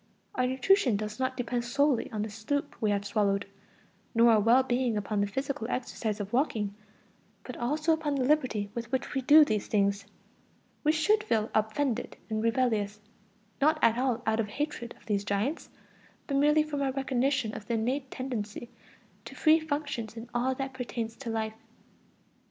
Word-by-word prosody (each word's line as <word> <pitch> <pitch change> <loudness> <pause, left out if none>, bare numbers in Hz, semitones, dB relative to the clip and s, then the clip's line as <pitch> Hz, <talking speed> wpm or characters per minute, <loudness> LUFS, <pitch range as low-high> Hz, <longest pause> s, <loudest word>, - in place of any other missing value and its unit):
Our 255 0 +1
nutrition 260 - +3
does 210 +2 -5
not 260 0 -1
depend 245 -1 -1
solely 275 +1 +1
on 210 -1 -2
the 215 - -4
soup 230 +7 -3
we 215 - +2
have 200 0 0
swallowed, 200 -1 +1 0.7
nor 230 +1 +6
our 220 - +5
well 235 +5 +5
being 245 -3 0
upon 205 0 -1
the 205 - +1
physical 265 +2 -3
exercise 225 -4 -3
of 205 +1 -5
walking, 225 -6 0 0.7
but 250 - -7
also 305 +6 +1
upon 310 -2 -1
the 265 - 0
liberty 250 -8 +1
with 235 0 -5
which 260 +2 -2
we 270 - 0
do 300 +4 +8
these 215 -6 -1
things. 200 -1 +1 0.8
We 305 - +4
should 420 +8 +2
feel 220 - 0
offended 225 +3 0
and 215 0 0
rebellious, 225 -3 +1 0.6
not 310 +2 +4
at 230 +1 +4
all 250 -2 0
out 220 0 +1
of 220 - 0
hatred 240 0 -4
of - - -23
these 205 -2 0
giants, 205 +9 -2 0.6
but 280 - -2
merely 300 +2 +4
from 295 -2 -4
our 270 -1 +1
recognition 265 -3 0
of 210 - -8
the 235 - 0
innate 260 +5 -1
tendency 240 -3 -5 0.5
to - - -9
free 315 0 +5
functions 285 -8 -4
in 230 +1 -8
all 255 +2 +1
that 270 0 -4
pertains 235 -3 -4
to 260 -4 -6
life. 220 -1 -2
240 Hz, 175 wpm, -29 LUFS, 215-275 Hz, 0.8 s, do